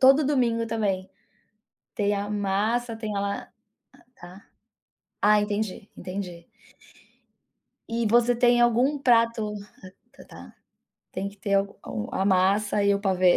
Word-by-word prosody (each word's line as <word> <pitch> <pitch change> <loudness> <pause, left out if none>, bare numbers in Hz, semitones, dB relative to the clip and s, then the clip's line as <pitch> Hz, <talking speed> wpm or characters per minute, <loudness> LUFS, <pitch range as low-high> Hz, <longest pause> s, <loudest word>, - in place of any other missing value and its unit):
todo 270 +3 +6
domingo 240 -5 +1
também, 195 -4 -1 0.9
tem 205 -1 +1
a 205 0 -3
massa, 210 +4 -1
tem 215 -2 -5
a - - 0
la 200 0 -3 0.7
tá. 180 +4 -12 0.8
Ah 210 0 +5
entendi, 205 -1 -3
entendi. 180 -3 -7 1.4
E 230 0 -1
você 240 +2 +3
tem 240 0 +4
algum 245 +5 +3
prato, 230 -4 +3
hum 205 - -7 0.7
tá, - - -13 0.6
tem 195 +2 -3
que 200 - -15
ter 200 0 -2
algum 195 - -2
a 190 - 0
massa 200 +2 +2
e 200 0 +4
o 200 - -2
pavê. 185 -3 +3
210 Hz, 130 wpm, -25 LUFS, 195-230 Hz, 1.4 s, todo